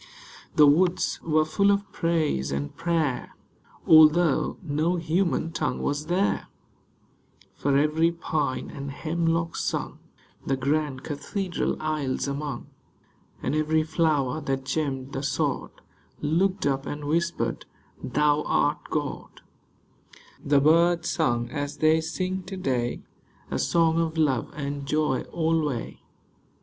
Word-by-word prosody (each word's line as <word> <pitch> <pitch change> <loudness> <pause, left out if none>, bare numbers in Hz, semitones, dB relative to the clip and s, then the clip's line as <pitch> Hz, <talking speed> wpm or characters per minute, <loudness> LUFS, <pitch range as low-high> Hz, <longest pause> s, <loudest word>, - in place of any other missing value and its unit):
The 150 - +7
woods 175 +5 +3
were 155 -1 +2
full 200 +6 +2
of 200 0 +1
praise 160 - 0
and 70 +1 -3
prayer, 160 -7 -1 0.5
Although 155 0 +5
no 160 +2 0
human 170 0 0
tongue 155 -2 -2
was 145 +2 -2
there; 185 +4 0 1.1
For 140 -1 +1
every 155 +3 +3
pine 155 -5 -2
and 140 -1 -6
hemlock 165 +3 -1
sung - - -3 0.4
The 135 - -1
grand 140 0 -1
cathedral 180 +5 -3
aisles 150 -4 -2
among. 140 +1 -4 0.8
And - - -1
every 155 +1 +2
flower 155 -3 0
that 135 -2 -2
gemmed 135 -2 -2
the 135 - -3
sod 140 -1 -1 0.5
Looked 185 +6 +1
up 135 -1 0
and 145 0 -5
whispered, 170 +3 -1 0.2
" - - -30
Thou 150 +3 +2
art 145 +1 +2
God." 145 -2 -4 1.0
The 145 0 +4
birds 170 +3 +3
sung 120 -7 0
as 145 +1 -4
they 155 +1 +4
sing 185 +3 -3
to 190 0 -6
day, 125 -8 -1 0.5
A - - -1
song 165 -1 +2
of 165 -1 -1
love 140 -7 +1
and 140 -1 -4
joy 150 -3 +1
alway. 160 -6 -1
155 Hz, 125 wpm, -26 LUFS, 140-165 Hz, 1.1 s, The